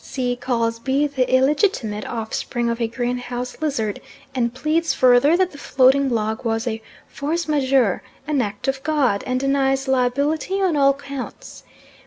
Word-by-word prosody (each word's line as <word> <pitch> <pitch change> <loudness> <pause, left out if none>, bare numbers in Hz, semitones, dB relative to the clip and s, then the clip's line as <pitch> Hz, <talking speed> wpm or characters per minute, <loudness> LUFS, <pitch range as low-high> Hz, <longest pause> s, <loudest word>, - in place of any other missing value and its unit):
C. 250 -2 -2
calls 230 -2 -1
B. 270 +4 +1
the 265 -3 -1
illegitimate 260 - +1
offspring 235 +1 -2
of 235 +1 -4
a 230 - +1
greenhouse 245 +2 -4
lizard, 225 -9 -2 0.3
and 240 -3 0
pleads 310 +6 0
further 255 +6 +5
that 370 -1 +1
the 285 - -12
floating 270 +1 +3
log 220 -2 -1
was 225 0 -1
a 225 -2 -3 0.3
force 320 +4 -3
majeure 265 -8 +2 0.2
an 295 -3 +1
act 205 +2 -4
of 270 0 -1
God, 275 -9 +1
and 255 0 0
denies 270 0 +1
liability 280 +8 0
on 370 -5 +1
all 275 -1 +4
counts. 275 -2 -8
260 Hz, 155 wpm, -21 LUFS, 240-285 Hz, 0.3 s, further